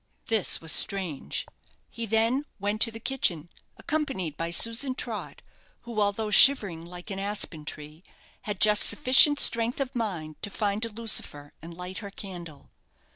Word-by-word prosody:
This 220 Hz, -5 st, +2 dB
was 160 Hz, -1 st, -2 dB
strange. 185 Hz, -8 st, -1 dB, 0.5 s
He 230 Hz, -1 st, -6 dB
then 225 Hz, +6 st, 0 dB
went 205 Hz, +2 st, -3 dB
to 230 Hz, -, +6 dB
the 225 Hz, -, -8 dB
kitchen, 180 Hz, -, 0 dB, 0.3 s
accompanied 270 Hz, -, -3 dB
by 165 Hz, +2 st, -4 dB
Susan 230 Hz, +9 st, +2 dB
Trott, -, -, -6 dB, 0.4 s
who, 235 Hz, -3 st, -4 dB
although 210 Hz, +1 st, -1 dB
shivering 205 Hz, -9 st, +5 dB
like 175 Hz, +3 st, -11 dB
an 195 Hz, -, -5 dB
aspen 195 Hz, -6 st, -2 dB
tree, 150 Hz, +3 st, -9 dB, 0.4 s
had 205 Hz, -2 st, -5 dB
just 210 Hz, -1 st, +4 dB
sufficient 285 Hz, +2 st, +5 dB
strength 230 Hz, +2 st, +2 dB
of 275 Hz, -1 st, -4 dB
mind 175 Hz, -10 st, -5 dB
to -, -, -5 dB
find 205 Hz, +1 st, -2 dB
a -, -, -6 dB
lucifer 205 Hz, -10 st, -2 dB
and 165 Hz, +1 st, -11 dB
light 180 Hz, +1 st, -7 dB
her 200 Hz, -, -8 dB
candle. 175 Hz, -7 st, -11 dB
205 Hz, 155 wpm, -26 LUFS, 170-230 Hz, 0.5 s, to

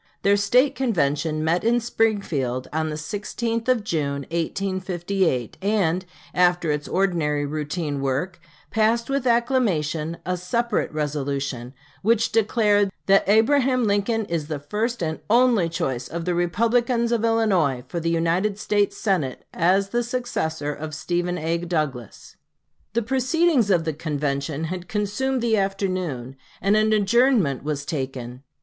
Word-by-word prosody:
Their 200 Hz, 0 st, +5 dB
State 250 Hz, +7 st, +3 dB
convention 155 Hz, -, 0 dB
met 165 Hz, +3 st, +1 dB
in 235 Hz, +2 st, +3 dB
Springfield 195 Hz, -, -1 dB
on 160 Hz, 0 st, 0 dB
the 150 Hz, -, -3 dB
16th 220 Hz, +8 st, -3 dB
of 250 Hz, -4 st, +2 dB
June, 140 Hz, -7 st, -2 dB
1858, 180 Hz, -, -1 dB
and, 190 Hz, -3 st, +1 dB, 0.3 s
after 175 Hz, -2 st, +3 dB
its 150 Hz, 0 st, -2 dB
ordinary 165 Hz, -6 st, 0 dB
routine 150 Hz, 0 st, -3 dB
work, 140 Hz, +7 st, -2 dB, 0.3 s
passed 225 Hz, +3 st, +1 dB
with 275 Hz, -2 st, 0 dB
acclamation 185 Hz, -, +1 dB
a 180 Hz, 0 st, -1 dB
separate 235 Hz, +7 st, -1 dB
resolution, 140 Hz, -4 st, -3 dB, 0.3 s
which 230 Hz, +2 st, +2 dB
declared 210 Hz, -2 st, +2 dB
"that 195 Hz, 0 st, +4 dB
Abraham 255 Hz, +4 st, +4 dB
Lincoln 215 Hz, +1 st, +1 dB
is 165 Hz, -5 st, -3 dB
the 155 Hz, -1 st, -3 dB
first 210 Hz, -, -2 dB
and 160 Hz, -1 st, -2 dB
only 235 Hz, -6 st, +4 dB
choice 130 Hz, -6 st, -2 dB
of 165 Hz, 0 st, -5 dB
the 180 Hz, -, 0 dB
Republicans 230 Hz, +7 st, +1 dB
of 230 Hz, -2 st, +1 dB
Illinois 190 Hz, -, +2 dB
for 170 Hz, -, -3 dB
the 165 Hz, 0 st, -1 dB
United 170 Hz, +5 st, +1 dB
States 205 Hz, -1 st, 0 dB
Senate 175 Hz, -, -1 dB
as 190 Hz, +3 st, +2 dB
the 240 Hz, +3 st, 0 dB
successor 195 Hz, -12 st, -2 dB
of 155 Hz, +1 st, -6 dB
Stephen 175 Hz, +2 st, -1 dB
A. 165 Hz, +1 st, -1 dB
Douglas." 155 Hz, -, -4 dB, 0.6 s
The 235 Hz, +1 st, +1 dB
proceedings 265 Hz, -, +2 dB
of 175 Hz, -4 st, +3 dB
the 160 Hz, -, -1 dB
convention 145 Hz, -1 st, -2 dB
had 180 Hz, +2 st, -4 dB
consumed 220 Hz, +5 st, -1 dB
the 225 Hz, -2 st, +2 dB
afternoon, 185 Hz, -10 st, -2 dB, 0.2 s
and 195 Hz, +2 st, +2 dB
an 215 Hz, 0 st, +3 dB
adjournment 215 Hz, -, +3 dB
was 145 Hz, -1 st, -3 dB
taken. 130 Hz, -4 st, -5 dB
180 Hz, 140 wpm, -23 LUFS, 155-225 Hz, 0.6 s, Their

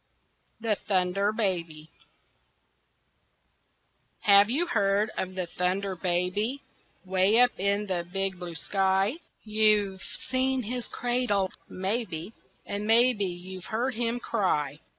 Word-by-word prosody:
THE 225 Hz, -1 st, +1 dB
THUNDER 195 Hz, +1 st, 0 dB
BABY 170 Hz, -8 st, -2 dB, 2.3 s
Have 200 Hz, 0 st, +6 dB
you 300 Hz, +9 st, +2 dB
heard 205 Hz, -, +1 dB
of 185 Hz, 0 st, -4 dB
the 185 Hz, -1 st, -2 dB
Thunder 185 Hz, +3 st, -1 dB
Baby 185 Hz, +9 st, -1 dB, 0.4 s
Way 190 Hz, +4 st, +3 dB
up 245 Hz, 0 st, +6 dB
in 200 Hz, +2 st, +1 dB
the 180 Hz, -3 st, -2 dB
big 195 Hz, -1 st, -2 dB
blue 175 Hz, -2 st, -7 dB
sky? 195 Hz, -, +1 dB, 0.3 s
You've 210 Hz, -3 st, +2 dB
seen 260 Hz, 0 st, -2 dB
his 245 Hz, +2 st, -4 dB
cradle, 240 Hz, -6 st, 0 dB, 0.2 s
maybe, 190 Hz, -2 st, -3 dB, 0.3 s
And 205 Hz, +1 st, -4 dB
maybe 230 Hz, -2 st, +4 dB
you've 185 Hz, +1 st, -7 dB
heard 245 Hz, +4 st, -1 dB
him 235 Hz, +1 st, -1 dB
cry. 150 Hz, -, -1 dB
200 Hz, 110 wpm, -27 LUFS, 185-225 Hz, 2.3 s, Have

